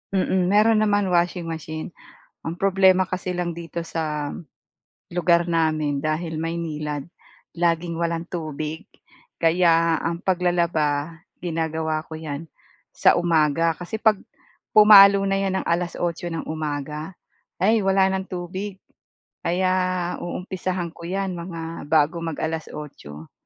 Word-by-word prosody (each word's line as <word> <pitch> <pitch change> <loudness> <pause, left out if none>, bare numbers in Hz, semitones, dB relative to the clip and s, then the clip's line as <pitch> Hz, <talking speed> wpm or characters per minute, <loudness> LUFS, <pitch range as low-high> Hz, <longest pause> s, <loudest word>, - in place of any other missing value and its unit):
Mm. 185 -1 +1
Mayro'n 215 +3 +4
naman, 205 -3 +2
washing 175 0 +1
machine. 160 0 -6 0.5
Ang 165 - -4
problema 190 -1 +4
kasi 185 0 -3
lang 175 -1 -2
dito 170 0 -6
sa 150 -3 -3 0.8
lugar 170 0 +2
namin, 155 -4 +1
dahil 160 +1 -2
Maynilad, 155 -3 -3 0.5
laging 170 0 0
walang 170 0 -2
tubig. 155 -2 -5 0.6
Kaya 165 -1 +4
ang 170 0 -2
paglalaba, 170 -4 0 0.2
ginagawa 160 -2 -2
ko - - -10
'yan 155 0 -5 0.5
sa - - +4
umaga 165 -1 +2
kasi 175 +5 -5
'pag 220 -2 +3 0.6
pumalo 200 -2 +9
na 195 0 +1
'yan 190 -1 0
ng - - -8
alas-otso 175 0 -1
nang 165 -1 -4
umaga, 155 +2 -4 0.4
ay 220 +4 +4
wala 190 0 +3
ng 190 0 -3
tubig. 185 +3 -5 0.7
Kaya 185 +2 +1 0.5
uumpisahan 180 -1 -4
ko 170 0 -10
'yan 195 +1 -2
mga 165 -3 -6
bago 155 +2 +3
mag-alas-otso. 150 - -6
170 Hz, 120 wpm, -23 LUFS, 160-185 Hz, 0.8 s, pumalo